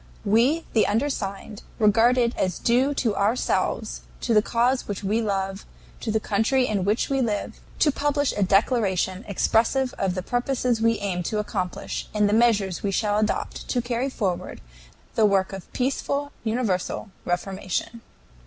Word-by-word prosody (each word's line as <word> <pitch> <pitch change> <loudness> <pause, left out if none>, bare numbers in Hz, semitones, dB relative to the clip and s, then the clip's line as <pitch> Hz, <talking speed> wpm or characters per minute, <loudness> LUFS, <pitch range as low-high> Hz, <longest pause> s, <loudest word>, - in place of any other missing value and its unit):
"We 250 +11 +3
the 220 - +4
undersigned, 210 -4 -2 0.2
regard 225 +3 +4
it 240 -1 +2
as 185 -2 -1
due 260 +4 +2
to 225 -6 0
ourselves, 205 +5 0 0.2
to 235 - 0
the 210 - +6
cause 245 +4 +1
which 205 0 -4
we 210 +4 +1
love, 195 -2 -2 0.4
to - - -4
the 220 0 +2
country 225 +6 +1
in 200 -5 -1
which 210 +3 +1
we 270 -1 +2
live, 215 -4 -2 0.2
to 295 - +4
publish 290 0 0
a - - -1
declaration 195 -2 +2
expressive 235 +6 +1
of 190 -2 0
the 185 - -3
purposes 245 -1 0
we 230 0 +3
aim 190 -3 -2
to 210 +5 -2
accomplish 195 -4 -3
and 210 -1 +3
the 205 - +1
measures 215 -6 +2
we 200 - -1
shall 205 +1 +1
adopt 215 - -2
to 250 - 0
carry 240 +2 -1
forward 195 -9 -3 0.5
the 220 -2 +4
work 195 -1 +1
of 195 -2 -9
peaceful 280 +2 -1
universal 220 -4 -1
reformation. 190 +5 -3
220 Hz, 160 wpm, -24 LUFS, 195-245 Hz, 0.5 s, the